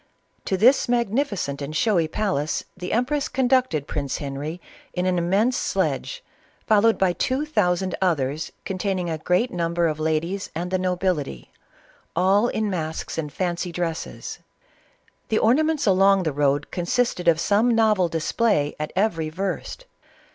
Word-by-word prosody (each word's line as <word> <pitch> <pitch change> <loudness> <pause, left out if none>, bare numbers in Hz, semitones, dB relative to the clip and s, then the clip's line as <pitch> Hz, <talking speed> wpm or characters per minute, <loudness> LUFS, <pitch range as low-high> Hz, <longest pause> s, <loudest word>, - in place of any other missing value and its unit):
To 190 - 0
this 245 +6 +4
magnificent 225 - 0
and 145 +2 -5
showy 175 -3 +2
palace, 155 -5 -1
the 180 0 -6
empress 270 +5 0
conducted 255 - +1
Prince 140 -3 -3
Henry 145 +4 -5 0.3
in 180 0 -1
an 180 -1 +1
immense 200 +9 +2
sledge, - - -1 0.4
fol 215 -2 +4
lowed 225 +1 +4
by 185 -2 +2
two 260 - -1
thousand 190 - 0
others 155 -4 0
containing 185 -2 -2
a 160 - -3
great 180 +10 +1
num 170 -1 -2
ber 170 0 +2
of 155 -1 -2
ladies 160 +5 -1
and 175 +2 -3
the 185 - +1
nobility, 180 - -2 0.6
all 200 +5 +3
in 220 -2 -1
masks 165 -4 -3
and 150 -2 -4
fancw 175 +1 -2
dresses. 170 -2 -4 0.9
The 220 - +2
amusements 305 +6 +2
along 195 -1 +4
the 155 -4 -1
road 145 0 +1
consisted 180 0 +1
o/ 165 - +5
some 205 +8 +2
novel 215 -6 +3
display 165 -1 0
at 150 - -3
every 175 -6 0
verst. 190 - -4
180 Hz, 145 wpm, -23 LUFS, 160-215 Hz, 0.9 s, o